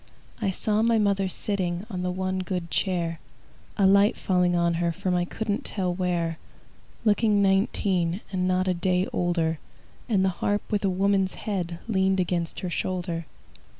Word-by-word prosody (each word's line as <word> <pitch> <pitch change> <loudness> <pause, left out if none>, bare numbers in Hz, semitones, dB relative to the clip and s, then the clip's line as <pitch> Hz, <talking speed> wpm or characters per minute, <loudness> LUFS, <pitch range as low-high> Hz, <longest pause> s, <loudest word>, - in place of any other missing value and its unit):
I 205 - +1
saw 210 +3 0
my 230 0 +3
mother 200 -2 +2
sitting 185 -1 -2
On 180 -2 -3
the 180 - -1
one 185 +1 -2
good 180 -2 -3
chair, 170 -4 0 0.6
A 200 - +4
light 200 +2 +5
falling 180 -2 +2
on 170 0 +2
her 170 -1 +2
From 185 +2 -2
I 175 0 +1
couldn't 210 +2 -3
tell 185 -3 -2
where, 175 -3 -1 0.7
Looking 210 -1 +3
nineteen, 195 -2 +1
And 185 -1 0
not 185 0 +1
a 185 - +3
day 180 +1 +1
older, 165 -3 0 0.5
And 195 -4 +3
the - - +3
harp 205 0 +1
with 210 -1 0
a 195 - +3
woman's 195 0 +1
head 180 -5 -3
Leaned 190 -3 +2
against 175 -2 -1
her 180 - -3
shoulder. 175 -3 -2
185 Hz, 165 wpm, -26 LUFS, 175-200 Hz, 0.7 s, light